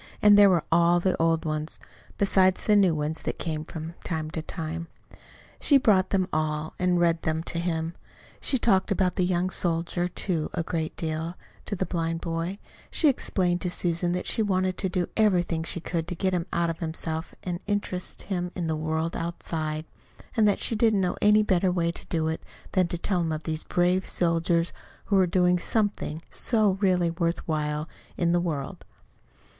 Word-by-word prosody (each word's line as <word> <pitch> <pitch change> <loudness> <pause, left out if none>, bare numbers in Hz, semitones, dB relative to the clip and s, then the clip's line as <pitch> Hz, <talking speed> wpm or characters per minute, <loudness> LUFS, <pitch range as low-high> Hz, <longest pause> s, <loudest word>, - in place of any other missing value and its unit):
And 210 -1 +7
there 205 -1 +8
were 175 -4 +3
all 170 +1 +5
the 185 +1 +1
old 165 0 +2
ones, 155 0 -3 0.4
besides 190 -2 +3
the 210 - +4
new 190 -5 +4
ones 155 +1 -1
that - - -3
came 155 -2 -3
from 160 0 -7
time 155 -2 -3
to 160 - -3
time. 165 0 -5 0.7
She 285 - +5
brought 195 -7 +3
them 190 -2 +1
all, 155 0 -1
and 180 -1 +2
read 170 -1 +2
them 160 0 -1
to 170 - -3
him. 165 -1 -2 0.5
She 265 - +1
talked 195 -5 +3
about 185 -3 +1
the 185 - +1
young 180 +1 +1
soldier, 175 0 0
too, 175 -3 -2
a 170 - 0
great 160 -2 -3
deal, 160 +1 -3 0.3
to 205 - -2
the 190 - -1
blind 165 -1 -2
boy 165 +3 -3 0.3
She 310 - +3
explained 180 -8 0
to 180 - -1
Susan 175 0 0
that 180 - -2
she - - 0
wanted 185 -3 +1
to 190 - 0
do 180 -1 0
everything 180 -6 +2
she 165 +1 -3
could 165 -1 -3
to 180 - -4
get 185 +2 0
him 175 -2 -1
out 170 -1 +1
of 165 - -8
himself 160 0 -4
and 175 -1 -3
interest 200 -3 -3
him 180 -3 -3
in 175 - -2
the 160 -1 0
world 160 +1 -2
outside; 160 -2 -3 0.5
and 220 -3 +4
that 205 - +3
she 230 - 0
didn't 220 -2 +3
know 180 - 0
any 210 +1 +5
better 185 -2 +2
way 170 -2 +1
to - - -12
do 160 -2 0
it 160 0 -2 0.3
than 185 -3 +2
to 175 - -3
tell 180 +1 0
him 165 -1 -1
of 155 0 -3
these 160 -1 -3
brave 180 +1 +1
soldiers 170 0 +1 0.3
who 200 - +1
were 190 -2 +5
doing 180 0 +3
something 200 -7 -1
so 215 -4 +3
really 180 -3 +3
worth 170 0 -2
while 150 -1 -1 0.3
in 170 -1 +2
the 175 0 +3
world. 150 -6 -4
175 Hz, 195 wpm, -26 LUFS, 165-185 Hz, 0.7 s, there